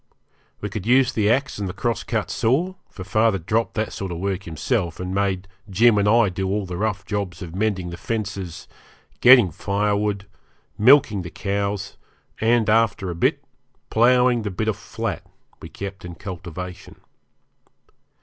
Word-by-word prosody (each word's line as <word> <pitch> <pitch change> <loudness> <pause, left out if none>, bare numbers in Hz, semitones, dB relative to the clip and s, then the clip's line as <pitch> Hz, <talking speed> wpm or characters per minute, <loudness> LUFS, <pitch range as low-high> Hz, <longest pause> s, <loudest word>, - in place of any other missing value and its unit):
We 105 - -3
could 105 0 -5
use 130 0 +4
the 105 -1 +2
axe 130 -1 0
and 100 -2 -2
the - - -5
cross 120 -2 -1
cut 110 -1 -2
saw, 140 +11 +1 0.2
for 95 - -9
father 110 +2 +2
dropped 110 +7 -1
that 110 0 -2
sort 95 -2 -5
of 85 - -4
work 95 +1 -3
himself, 85 - -2
and 90 0 -4
made 95 -1 -1 0.2
Jim 110 +3 +4
and 100 0 +3
I 115 -2 +5
do 95 +1 -3
all 100 0 -1
the 90 -1 -6
rough 100 0 -2
jobs 100 -5 -3
of 85 -2 -8
mending 95 -3 -1
the 85 - -7
fences, 100 -5 -4 0.5
getting 125 -7 +7
firewood, 100 +2 -1 0.5
milking 125 -3 +5
the 85 - -7
cows, 100 +1 -3 0.4
and, 115 0 +3
after 105 -4 +2
a - - -5
bit, 85 - +1 0.5
ploughing 125 +1 +4
the 105 - -3
bit 105 +3 -3
of 110 - 0
flat 110 -3 -4 0.4
we - - -9
kept 100 -2 -7
in 90 -1 -8
cultivation. 90 -1 -8
100 Hz, 165 wpm, -22 LUFS, 95-115 Hz, 0.5 s, getting